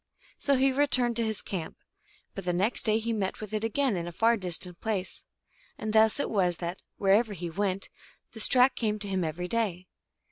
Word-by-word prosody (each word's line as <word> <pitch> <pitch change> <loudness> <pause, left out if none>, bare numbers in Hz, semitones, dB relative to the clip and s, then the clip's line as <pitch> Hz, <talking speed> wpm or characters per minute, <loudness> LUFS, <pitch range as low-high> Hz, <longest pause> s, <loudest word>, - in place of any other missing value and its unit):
So 280 - +2
he 270 +1 +3
returned 260 -3 +2
to 230 - +1
his 220 -2 -2
camp; 175 -5 -5 0.6
but 195 - -6
the 175 0 -1
next 200 +7 0
day 215 0 +4
he 230 +1 -2
met 195 -3 -2
with 215 -1 -8
it 215 0 -1
again 240 +1 +1
in 170 -1 -3
a - - -5
far 230 +7 +3
distant 180 -3 -2
place. 210 -5 -3 0.5
And 215 -1 -4
thus 220 +3 +4
it - - -1
was 180 -5 +2
that, 175 +1 -5 0.2
wherever 205 +3 +3
he 175 -2 -5
went, 195 +1 -1 0.4
this 220 -2 +6
track 255 0 +4
came 215 -2 -1
to 205 -1 -5
him 190 -2 -1
every 165 +3 -3
day. 195 -5 -1
210 Hz, 205 wpm, -28 LUFS, 185-230 Hz, 0.6 s, this